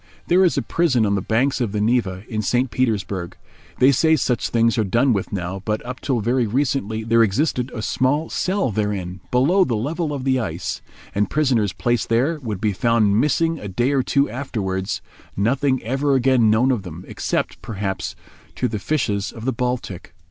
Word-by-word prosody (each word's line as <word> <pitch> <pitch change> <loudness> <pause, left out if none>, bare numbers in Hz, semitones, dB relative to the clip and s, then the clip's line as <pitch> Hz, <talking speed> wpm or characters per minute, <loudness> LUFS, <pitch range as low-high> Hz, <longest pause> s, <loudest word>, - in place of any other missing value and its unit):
There 185 +2 +4
is 180 - +2
a - - +1
prison 135 -10 +2
on 100 - +1
the 100 - 0
banks 125 +7 +1
of 110 -4 -1
the 105 - -1
Neva, 105 -4 0
in 110 -3 -2
St. 120 +4 0
Petersburg. 100 -7 -1 0.4
They 130 +2 +6
say 160 +4 +4
such 125 -4 0
things 115 -1 +2
are - - +3
done 115 +6 +2
with 100 - -2
now, 95 0 -4
but 105 +2 -2
up 125 +1 -6
till 125 -5 -1
very 120 +2 +1
recently 115 -3 -1
there 115 +1 +3
existed 125 +3 +1
a 110 - -4
small 130 - +1
cell 185 - -1
therein, 95 -4 -2
below 150 +10 +4
the 125 -10 -1
level 150 +8 -2
of 140 -3 -4
the 130 -1 +2
ice, 115 - -4 0.3
and 100 +1 0
prisoners 125 -9 +1
placed 120 +2 -1
there 135 +8 +1
would 110 -8 -4
be 105 0 0
found 110 0 +2
missing 165 +2 +1
a 105 - -6
day 120 +8 0
or 140 -2 +2
two 140 +2 +1
afterwards, 100 -7 -3 0.3
nothing 130 +6 +1
ever 135 +4 +1
again 130 -3 +4
known 120 +5 +3
of 120 -5 0
them, 90 -1 -9
except, - - -2
perhaps, 100 -3 -4 0.4
to 125 - 0
the 110 -3 -3
fishes 105 -7 -1
of 115 0 -9
the 130 - 0
Baltic. 125 -6 -4
120 Hz, 190 wpm, -21 LUFS, 105-135 Hz, 0.4 s, They